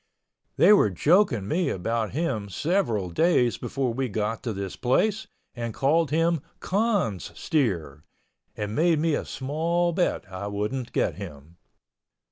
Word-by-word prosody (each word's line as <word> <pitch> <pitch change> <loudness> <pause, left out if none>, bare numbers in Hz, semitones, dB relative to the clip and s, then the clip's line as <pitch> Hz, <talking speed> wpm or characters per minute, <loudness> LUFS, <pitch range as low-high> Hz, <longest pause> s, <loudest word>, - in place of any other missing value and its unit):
They 210 - +7
were 195 - +5
joking 135 - +2
me 170 - 0
about 110 +4 -1
him 125 -9 -2
several 115 - 0
days 125 - +2
before 130 -4 -2
we 130 +1 -2
got 105 +2 -2
to 115 - -3
this 100 -2 -5
place 210 - +1 0.3
and 115 -2 -5
called 155 +3 +2
him 165 +1 +1 0.2
"Con's 200 - 0
steer," 85 - -1 0.5
and 105 0 -3
made 165 +4 +3
me 160 +1 +1
a - - -1
small 165 +5 -1
bet 175 +1 0
I 95 +2 -4
wouldn't 105 +5 -3
get - - 0
him. 75 +4 -10
130 Hz, 140 wpm, -26 LUFS, 105-170 Hz, 0.5 s, They